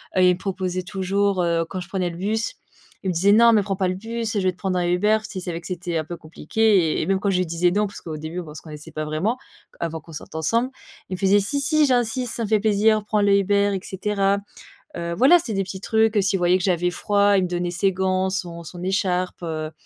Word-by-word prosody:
et 185 -1 +5
il - - +5
me - - -15
proposait 185 -1 -3
toujours, 195 +1 0
heu, 165 -1 +1
quand 185 - -4
je 175 - -9
prenais 185 -2 -1
le 170 - -8
bus, 220 - -2 0.5
il 190 - -1
me - - -2
disait: 195 +4 +4
«Non, 230 +2 +7
mais 215 - +5
prends 195 -1 -2
pas 190 - +1
le 185 - 0
bus, 225 +2 -4
je - - +2
vais 185 -1 +2
te - - -26
prendre 185 -1 -1
un 175 - 0
Uber», 210 +5 +3
s'il 190 - -5
savait 170 -2 -4
que - - -10
c'était 175 -2 -3
un 155 - -1
peu 175 +2 -7
compliqué 170 +3 +1
et - - -1
même 195 0 +2
quand 200 - 0
je 185 - +1
lui 185 - +1
disais: 170 +2 +1
«Non», 210 +3 +2
parce 200 - -11
qu'au 160 -2 -6
début, 155 +3 -5
on 155 -3 -10
se - - -8
connaissait 150 -2 -10
pas 155 0 -4
vraiment, 165 +11 -1 0.4
avant 165 -1 -3
qu'on 165 - -14
sorte 155 - -9
ensemble, 230 - 0 0.4
il - - -4
me - - -9
faisait: 200 +1 +4
«Si, 280 +8 -2
si, 310 +2 +3
j'insiste, 245 -1 0
ça 230 - -2
me 210 - -3
fait 215 -1 +3
plaisir, 215 0 +3
prend 210 0 +1
le 200 -1 +4
Uber» 200 +1 +2
et - - -2
cetera. 200 0 0 0.6
Heu, 170 0 -3
voilà, 275 - +6
c'est 235 -8 -5
des 195 -1 0
petits 190 0 -7
trucs, 220 +1 +2
heu, - - +5
s'il 195 0 +1
voyait 175 +1 +4
que - - -4
j'avais 180 -1 +1
froid, 205 +2 +2
il 190 - +2
me - - 0
donnait 175 0 -2
ses 195 +2 +1
gants, 190 0 0
son 175 -3 -4
son 175 +2 -9
écharpe, 185 -1 -1
heu, 155 -2 -3
190 Hz, 265 wpm, -23 LUFS, 175-205 Hz, 0.6 s, Non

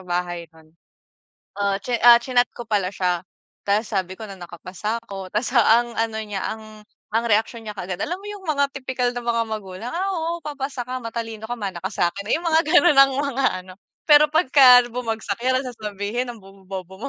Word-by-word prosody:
bahay 175 -1 -3
nun. 160 0 -20 0.9
Ah, 200 -1 +1
chi 240 0 -1
ah 240 0 +10
chinat 245 0 +1
ko 240 - -6
pala 200 -4 +1
siya, 180 -3 0 0.5
tas 210 +2 +1
sabi 190 -1 -1
ko 220 - -7
na 195 - -9
nakapasa 185 +5 -5
ako. 195 -1 -7
Tapos 215 +4 -1
ang 235 0 +4
ano 225 -1 -1
niya, 205 -3 -5
ang 215 -1 -13 0.3
ang 230 +1 +2
reaksiyon 225 +2 0
niya 210 - -6
kaagad, 180 -1 -5
alam 350 - -2
mo 395 - -15
yung 410 -2 -9
mga 280 -2 +1
tipikal 255 -2 -1
na 245 - -3
mga 230 -1 +1
magulang, 215 +2 -6
"Ah, 375 +3 -1
oo, 335 +1 -2
papasa 275 -3 -5
ka 255 +1 -4
matalino 225 -1 -5
ka, 240 - -3
mana 195 -3 -4
ka 190 - -1
sa 175 - +2
akin", 200 0 -7
yung 340 +2 -3
mga 320 0 +4
ganun, 345 -4 +6
ang 275 0 +7
mga 275 -2 -1 0.2
ano, 185 - -12 0.3
pero 300 -1 +7
'pagka 260 -6 +6
bumagsak 225 -4 -3
yan 260 +1 +2
sasabihin, 220 +1 -4
"Ang 235 - -13
bobo, 195 0 -17
bobo 190 -1 -7
225 Hz, 195 wpm, -22 LUFS, 195-255 Hz, 0.9 s, ah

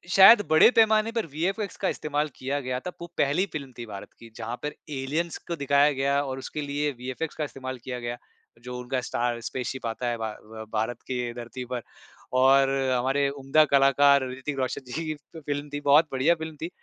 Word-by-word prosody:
शायद 200 +3 +10
बड़े 155 +7 +7
पैमाने 220 -1 +4
पर 230 -1 -1
वीएफएक्स 185 +7 -2
का - - +3
इस्तेमाल 150 0 -1
किया 140 +2 -2
गया 125 0 -2
था 180 - -6
वो 170 - -5
पहली 145 +7 +2
फ़िल्म 140 -4 -5
थी 120 - -6
भारत 100 -3 -9
की 115 - -12
जहाँ 115 +1 -4
पर 150 - -3 0.2
एलियंस 155 +6 -2
को 170 - -2
दिखाया 140 0 +3
गया 140 +1 +1
और 135 -1 -4
उसके 150 +3 -5
लिए 145 +1 -1
वीएफएक्स 130 +6 -5
का 155 - -2
इस्तेमाल 130 -1 -6
किया 125 -2 -5
गया। 120 0 -4 0.5
जो 125 0 -6
उनका 125 +1 -2
स्टार 120 -1 -1
स्पेसशिप 130 +2 -4
आता 115 +2 -3
है 120 -1 -1
भा 110 -1 -3
अ, 110 +1 -10
भारत 110 +2 -1
के 125 -2 -2
धरती 120 +1 -7
पर 125 -1 -4 0.6
और 135 +1 +5 0.3
हमारे 135 +3 +1
उम्दा 140 +2 +3
कलाकार 140 0 +5
ऋतिक 130 +2 -5
रोशन 130 +1 -2
जी 165 - -3
की 155 - -2 0.3
फ़िल्म 145 -1 -4
थी 145 - -2
बहुत 145 +3 +5
बढ़िया 135 +6 +3
फ़िल्म 160 -1 -7
थी। 165 - -3
135 Hz, 200 wpm, -26 LUFS, 125-150 Hz, 0.6 s, शायद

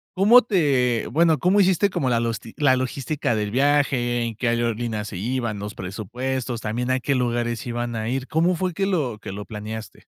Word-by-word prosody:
¿cómo 215 +7 +7
te 140 - +1
bueno, 160 +2 +3
cómo 185 +7 +3
hiciste 190 +1 +3
como 135 -7 -1
la 115 - +2
losti 115 -1 -4
la 140 -4 +3
logística 130 0 -2
del 105 -1 -2
viaje, 130 -3 +2
en 115 -1 -4
qué 120 +3 -2
aerolínea 115 -2 -1
se 105 -3 -7
iban 115 0 -2
los 105 +1 -6
presupuestos, 120 +5 -4
también 120 +4 -2
a 130 - +2
qué 140 - 0
lugares 120 -1 -1
se - - -7
iban 120 0 -3
a 110 0 -3
ir? 130 +1 -2
¿Cómo 170 +3 +2
fue 180 0 -2
que 195 - -1
lo 145 - -1
que - - -7
lo 105 +1 -6
planeaste? 110 0 -7
120 Hz, 205 wpm, -23 LUFS, 115-145 Hz, -, cómo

